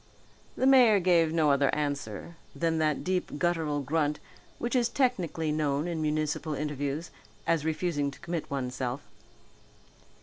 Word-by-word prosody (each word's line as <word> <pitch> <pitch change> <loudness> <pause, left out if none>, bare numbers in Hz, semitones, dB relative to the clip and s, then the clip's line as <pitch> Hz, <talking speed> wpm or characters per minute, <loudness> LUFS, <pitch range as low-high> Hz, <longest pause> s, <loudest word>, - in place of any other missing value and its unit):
The 260 - +1
mayor 250 -6 +7
gave 170 -3 +3
no 160 -3 +3
other 140 -1 +3
answer 145 -1 -3 0.2
than 165 -1 0
that 155 -2 +1
deep 185 -4 -1
guttural 160 -4 0
grunt 150 +1 0 0.4
which 240 +2 -2
is 240 -2 +3
technically 180 - 0
known 150 0 0
in 165 -2 -2
municipal 155 0 -1
interviews 145 +2 -3 0.3
as 165 -2 +1
refusing 160 -3 0
to 140 - -12
commit 170 -2 -4
oneself. 130 -1 -3
155 Hz, 135 wpm, -29 LUFS, 145-170 Hz, 0.4 s, mayor